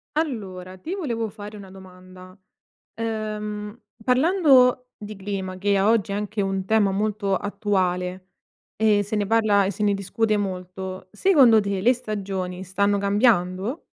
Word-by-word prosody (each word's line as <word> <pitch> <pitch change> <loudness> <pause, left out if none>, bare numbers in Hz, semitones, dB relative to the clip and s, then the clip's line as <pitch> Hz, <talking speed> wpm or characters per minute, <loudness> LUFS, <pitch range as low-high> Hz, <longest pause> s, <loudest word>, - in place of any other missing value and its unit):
Allora, 190 - -4
ti 320 - -6
volevo 235 - -3
fare 210 0 -10
una 195 -2 -11
domanda. 185 0 -14 0.6
Ehm, 215 -1 -4 0.2
parlando 255 - +4
di 210 0 -9
clima 190 -1 -5
che 200 +1 +1
a 195 +2 +3
oggi 215 -4 +2
è - - -1
anche 210 +1 -3
un 195 -1 -1
tema 210 -2 +3
molto 205 -1 -1
attuale 185 -3 -1 0.5
e 210 -1 +3
se 210 +2 -4
ne 205 -1 0
parla, 215 -2 +3
e 195 - -1
se 210 - -4
ne 205 -1 +3
discute 210 +2 0
molto, 185 -1 -5
secondo 255 - +5
te 200 -1 -2
le 245 +6 +5
stagioni 195 -6 -5
stanno 200 +2 +1
cambiando? 200 - +1
205 Hz, 145 wpm, -23 LUFS, 190-220 Hz, 0.6 s, secondo